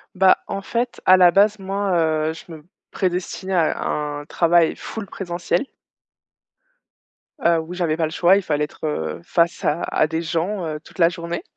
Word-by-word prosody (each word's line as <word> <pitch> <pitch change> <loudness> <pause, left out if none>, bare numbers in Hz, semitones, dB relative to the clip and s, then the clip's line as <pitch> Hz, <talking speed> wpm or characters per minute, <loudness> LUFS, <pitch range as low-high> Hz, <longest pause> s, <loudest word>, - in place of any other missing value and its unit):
Bah, 190 0 +5
en 195 - -4
fait, 240 +4 -3
à 185 0 +7
la 180 -1 +6
base, 205 +2 +3
moi, 195 +1 -2 0.4
heu, - - -3
je 165 - -13
me 155 -1 -11 0.3
prédestinais 185 +1 -2
à 165 -3 +1
un 145 -1 -3
travail 170 +1 +2
full 220 -2 -7
présentiel 175 +4 -3 1.8
heu, 170 -1 +4
où 165 +3 -8
j'avais 170 -3 -1
pas 165 - +1
le 155 - -5
choix, 175 +3 +4
il 200 - +2
fallait 150 -5 -1
être, 150 - -10
heu, 80 - -3
face 170 0 0
à 155 +3 0
à 155 - +1
des 160 +1 -2
gens, 170 +3 -2
heu, 155 -1 -4
toute - - -18
la 165 0 +6
journée. 170 0 -5
170 Hz, 180 wpm, -21 LUFS, 160-190 Hz, 1.8 s, à